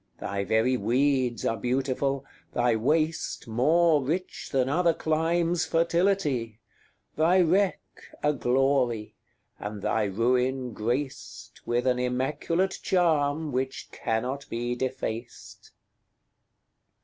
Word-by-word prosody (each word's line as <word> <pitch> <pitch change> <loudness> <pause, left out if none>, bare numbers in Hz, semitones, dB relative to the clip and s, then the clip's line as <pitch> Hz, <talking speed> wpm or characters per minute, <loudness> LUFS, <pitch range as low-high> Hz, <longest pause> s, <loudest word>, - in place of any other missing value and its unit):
Thy 100 0 -3
very 110 +6 +2
weeds 125 +2 +1
are 115 - 0
beautiful, 135 +3 -1 0.3
thy 120 -1 +2
waste 155 +6 0
More 155 +7 +3
rich 175 +7 -3
than 130 -2 +2
other 165 +3 +2
climes' 165 +2 +1
fertility; 165 - +1 0.6
Thy 170 +4 +4
wreck 185 +3 +2 0.4
a 150 0 +3
glory, 125 -4 +1 0.5
and 105 -1 -6
thy 110 -1 +1
ruin 125 +4 0
graced 125 +6 -4
With 120 +1 0
an 125 -1 +2
immaculate 145 +9 -1
charm 155 -4 +1
which 130 +1 -3
cannot 125 +5 -3
be 120 +1 -2
defaced. 125 -2 -5
130 Hz, 100 wpm, -27 LUFS, 120-160 Hz, 0.6 s, Thy